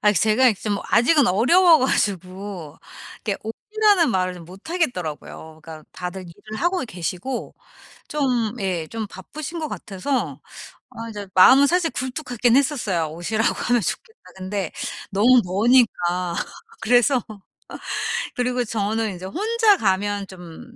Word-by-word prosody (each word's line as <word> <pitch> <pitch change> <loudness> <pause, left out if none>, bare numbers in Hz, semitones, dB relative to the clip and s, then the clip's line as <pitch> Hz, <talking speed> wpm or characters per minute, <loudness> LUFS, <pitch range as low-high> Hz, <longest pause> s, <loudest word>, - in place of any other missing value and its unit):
아 210 0 +4
제가 220 +7 +4
이제 210 - -2
좀 205 -2 -1
아직은 260 +5 +4
어려워 320 - +5
가지고 185 - -2 0.5
이렇게 205 -3 -1
"오시라."는 405 - +1
말을 185 -2 0
좀 175 - -11
못하겠더라고요. 180 - -5
그러니까 160 -1 -10
다들 180 +1 -6
일을 215 +6 -10
하고 355 +1 +1
계시고 185 +5 -5 0.5
좀 250 -7 0
예 180 -5 -2
좀 225 -2 -5
바쁘신 305 - -7
것 310 - -3
같아서 195 - -3 0.5
아 230 0 -8
이제 205 -2 -7
마음은 260 +9 +7
사실 345 +2 +1
굴뚝하긴 250 -2 0
했었어요. 235 - 0
'"오시라."고 215 +7 -1
하면 245 -1 +3
좋겠다.' 445 - -4 0.2
근데 190 -1 -4 0.4
너무 240 +6 +5
머니까 180 -4 +2 0.5
그래서 245 +2 +3 1.1
그리고 250 0 0
저는 215 0 -1
인제 180 0 -8
혼자 425 - +2
가면 200 - 0
좀 190 +7 -12
215 Hz, 295 characters per minute, -22 LUFS, 185-260 Hz, 1.1 s, 마음은